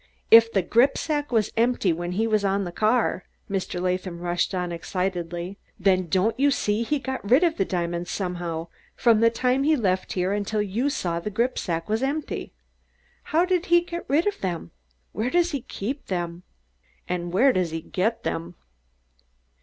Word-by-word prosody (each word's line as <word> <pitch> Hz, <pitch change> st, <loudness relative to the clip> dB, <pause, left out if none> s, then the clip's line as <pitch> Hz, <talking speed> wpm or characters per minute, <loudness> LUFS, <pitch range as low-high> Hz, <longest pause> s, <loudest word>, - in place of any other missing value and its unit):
"If 230 Hz, 0 st, +8 dB
the 195 Hz, -4 st, +1 dB
gripsack 285 Hz, -, +1 dB
was 220 Hz, -4 st, +1 dB
empty 230 Hz, -6 st, +2 dB
when 175 Hz, +2 st, -4 dB
he 220 Hz, +5 st, +1 dB
was 215 Hz, -2 st, +1 dB
on 200 Hz, 0 st, +1 dB
the 175 Hz, -, -5 dB
car," 215 Hz, 0 st, +1 dB, 0.2 s
Mr. 190 Hz, -2 st, -3 dB
Latham 180 Hz, -1 st, -2 dB
rushed 175 Hz, +2 st, -1 dB
on 180 Hz, -1 st, -2 dB
excitedly, 175 Hz, +1 st, -3 dB, 0.2 s
"then 185 Hz, -1 st, +2 dB
don't 205 Hz, +7 st, +1 dB
you 285 Hz, +1 st, +5 dB
see 210 Hz, -5 st, 0 dB
that -, -, -9 dB
he 300 Hz, -, +2 dB
got 265 Hz, -6 st, -5 dB
rid 260 Hz, +8 st, +6 dB
of 335 Hz, -2 st, +2 dB
the 195 Hz, -, +1 dB
diamonds 175 Hz, -1 st, -2 dB
somehow 175 Hz, -3 st, -3 dB, 0.3 s
from 230 Hz, -3 st, +4 dB
the 230 Hz, +1 st, +5 dB
time 250 Hz, +3 st, +1 dB
he 310 Hz, +3 st, +3 dB
left 190 Hz, -7 st, 0 dB
here 185 Hz, +1 st, 0 dB
until 205 Hz, +1 st, -1 dB
you 210 Hz, +7 st, 0 dB
saw 170 Hz, -10 st, -2 dB
that -, -, -12 dB
the -, -, 0 dB
gripsack 205 Hz, -7 st, -1 dB
was 220 Hz, +2 st, 0 dB
empty? 285 Hz, +3 st, -3 dB, 0.7 s
How 335 Hz, +3 st, +2 dB
did 365 Hz, 0 st, 0 dB
he 345 Hz, 0 st, +5 dB
get 345 Hz, 0 st, -7 dB
rid 300 Hz, +5 st, +3 dB
of 415 Hz, -, -1 dB
them? 175 Hz, -, -3 dB, 0.4 s
Where 225 Hz, +3 st, -1 dB
does 350 Hz, +3 st, +2 dB
he 280 Hz, -4 st, -2 dB
keep 250 Hz, +6 st, -5 dB
them? 175 Hz, -2 st, -3 dB, 0.7 s
And 175 Hz, -1 st, -3 dB
where 250 Hz, +9 st, +4 dB
does 180 Hz, -2 st, 0 dB
he 165 Hz, 0 st, -4 dB
get 190 Hz, +7 st, -1 dB
them?" 170 Hz, +2 st, -3 dB
200 Hz, 185 wpm, -25 LUFS, 180-250 Hz, 0.7 s, If